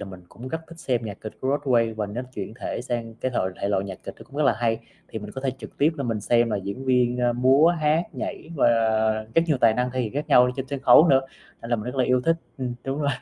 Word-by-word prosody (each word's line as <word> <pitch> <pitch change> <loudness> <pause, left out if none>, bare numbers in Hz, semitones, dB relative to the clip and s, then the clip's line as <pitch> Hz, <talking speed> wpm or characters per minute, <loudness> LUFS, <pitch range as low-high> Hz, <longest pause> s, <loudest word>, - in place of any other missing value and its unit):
là - - -5
mình 95 -2 -10
cũng 125 +3 -10
rất 160 - -3
thích 165 0 -13
xem 125 -8 -1
nhạc 105 -2 -7
kịch 110 - -7
của 130 - -2
Broadway, 115 -5 +2
và 105 -1 -2
nó 110 +5 -5
chuyển 110 - -6
thể - - -3
sang 115 -3 -4
cái 130 +3 -3
thoại 95 -6 -1
thể 100 - -1
loại 100 -1 0
nhạc 95 -2 -7
kịch - - -7
nó - - -11
cũng 140 - -14
rất 150 - +1
là 135 - +5
hay, 115 -1 +1 0.3
thì - - -5
mình 105 0 -8
có 130 - -6
thể 135 0 0
trực - - -11
tiếp, 155 +3 +3
ơ, 140 - -2
mình 115 -3 -2
xem 120 +2 +2
là 105 - 0
diễn 100 +7 -5
viên, 125 -1 +2
ơ, 120 -1 +2
múa 130 +6 +5
hát, 160 -1 +2
nhảy 160 - -6
và - - +4 0.7
rất 165 - +5
nhiều 150 -4 +2
tài 115 -2 +5
năng 125 0 0
thể 130 +1 -2
hiện 110 -4 -3
khác 150 +2 -3
nhau 125 -3 +7
ở 125 - +1
trên 135 0 -4
sân 140 0 -4
khấu 150 +7 +7
nữa, 135 -2 +5 0.4
nên 115 - -8
là 120 - +3
mình 105 - -6
rất 125 +2 -5
là 130 - +3
yêu 125 0 +2
thích, 165 +6 +2 0.2
ừm, 125 -2 -3
đúng 135 +3 -3
rồi. 145 - +1
125 Hz, 300 wpm, -24 LUFS, 115-135 Hz, 0.7 s, nhau